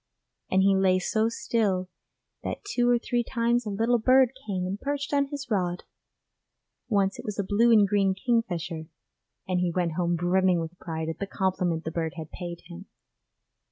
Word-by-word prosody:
And 190 Hz, 0 st, +3 dB
he 195 Hz, 0 st, +4 dB
lay 190 Hz, -1 st, +3 dB
so 215 Hz, +4 st, +1 dB
still 205 Hz, -5 st, 0 dB, 0.5 s
that -, -, -5 dB
two 245 Hz, -11 st, +1 dB
or 245 Hz, -, +5 dB
three 240 Hz, 0 st, -1 dB
times 235 Hz, -1 st, 0 dB
a -, -, -1 dB
little 225 Hz, +4 st, +1 dB
bird 255 Hz, +2 st, +5 dB, 0.2 s
came 185 Hz, -3 st, -2 dB
and 195 Hz, +3 st, -4 dB
perched 285 Hz, +1 st, -3 dB
on 280 Hz, -1 st, +2 dB
his 280 Hz, -2 st, -7 dB
rod 180 Hz, -3 st, 0 dB, 1.1 s
once 200 Hz, -3 st, +1 dB
it -, -, -7 dB
was 210 Hz, -, -4 dB
a 200 Hz, -, 0 dB
blue 220 Hz, +5 st, +3 dB
and 210 Hz, -3 st, +6 dB
green 195 Hz, -1 st, +2 dB
kingfisher 180 Hz, -8 st, -1 dB, 0.6 s
and 185 Hz, -1 st, 0 dB
he 180 Hz, -1 st, +1 dB
went 175 Hz, -1 st, 0 dB
home 175 Hz, 0 st, 0 dB
brimming 180 Hz, +1 st, +2 dB
with 165 Hz, +2 st, -6 dB
pride 160 Hz, -2 st, -4 dB
at 165 Hz, -, -4 dB
the 200 Hz, -, -3 dB
compliment 180 Hz, -4 st, -1 dB
the 160 Hz, -, -4 dB
bird 165 Hz, -1 st, -3 dB
had 160 Hz, -1 st, -7 dB
paid 175 Hz, -2 st, -7 dB
him. 175 Hz, +3 st, -11 dB
190 Hz, 185 wpm, -27 LUFS, 175-230 Hz, 1.1 s, and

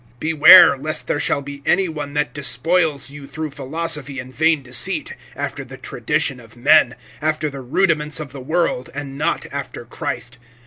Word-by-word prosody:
(8)Beware 160 Hz, -1 st, +7 dB
lest 155 Hz, 0 st, -1 dB
there 145 Hz, -, -1 dB
shall 140 Hz, -, 0 dB
be 140 Hz, 0 st, -9 dB
any 190 Hz, +5 st, +2 dB
one 150 Hz, -3 st, -6 dB
that 150 Hz, 0 st, -1 dB
despoils 145 Hz, +2 st, 0 dB
you 145 Hz, -1 st, -10 dB
through 155 Hz, +2 st, -5 dB
philosophy 145 Hz, 0 st, -3 dB
and 130 Hz, 0 st, -8 dB
vain 160 Hz, -1 st, +2 dB
deceit, 125 Hz, -2 st, 0 dB, 0.2 s
after -, -, -4 dB
the -, -, -11 dB
tradition -, -, -2 dB
of -, -, -16 dB
men, -, -, +4 dB, 0.3 s
after 155 Hz, -1 st, -1 dB
the 135 Hz, -1 st, -8 dB
rudiments 150 Hz, +2 st, +1 dB
of 150 Hz, -4 st, -7 dB
the 135 Hz, -1 st, -9 dB
world, 155 Hz, -3 st, -1 dB
and 140 Hz, -1 st, -6 dB
not 145 Hz, -, -1 dB
after -, -, -6 dB
Christ. 120 Hz, +1 st, -6 dB
145 Hz, 170 wpm, -20 LUFS, 135-160 Hz, 0.3 s, 8)Beware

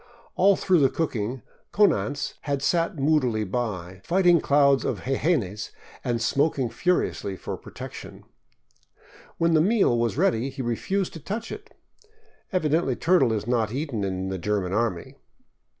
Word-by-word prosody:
All 195 Hz, +1 st, +5 dB
through 185 Hz, -2 st, +2 dB
the 135 Hz, -2 st, +4 dB
cooking 125 Hz, -5 st, -3 dB, 0.3 s
Konanz 145 Hz, -8 st, +1 dB
had 140 Hz, -1 st, -1 dB
sat 165 Hz, +3 st, +1 dB
moodily 135 Hz, -7 st, +2 dB
by, 95 Hz, -4 st, -4 dB
fighting 175 Hz, -2 st, +4 dB
clouds 140 Hz, -1 st, +4 dB
of -, -, -2 dB
jejenes 130 Hz, -, -1 dB, 0.3 s
and 120 Hz, -1 st, -1 dB
smoking 135 Hz, +1 st, +1 dB
furiously 175 Hz, -, 0 dB
for -, -, -5 dB
protection. -, -, -10 dB, 1.1 s
When 165 Hz, 0 st, +2 dB
the 155 Hz, -, +5 dB
meal 200 Hz, -, +3 dB
was 115 Hz, +1 st, 0 dB
ready 135 Hz, -8 st, +1 dB
he 135 Hz, 0 st, -6 dB
refused 180 Hz, -, -1 dB
to 165 Hz, -, -8 dB
touch 210 Hz, +9 st, -5 dB
it. 425 Hz, +1 st, -9 dB, 0.8 s
Evidently 155 Hz, -, +1 dB
turtle 165 Hz, -7 st, +3 dB
is 105 Hz, -2 st, -2 dB
not 115 Hz, -3 st, 0 dB
eaten 130 Hz, -5 st, -3 dB
in 95 Hz, -1 st, -2 dB
the 95 Hz, -1 st, -4 dB
German 95 Hz, -1 st, -1 dB
army. 105 Hz, -5 st, -2 dB
135 Hz, 140 wpm, -25 LUFS, 110-165 Hz, 1.1 s, All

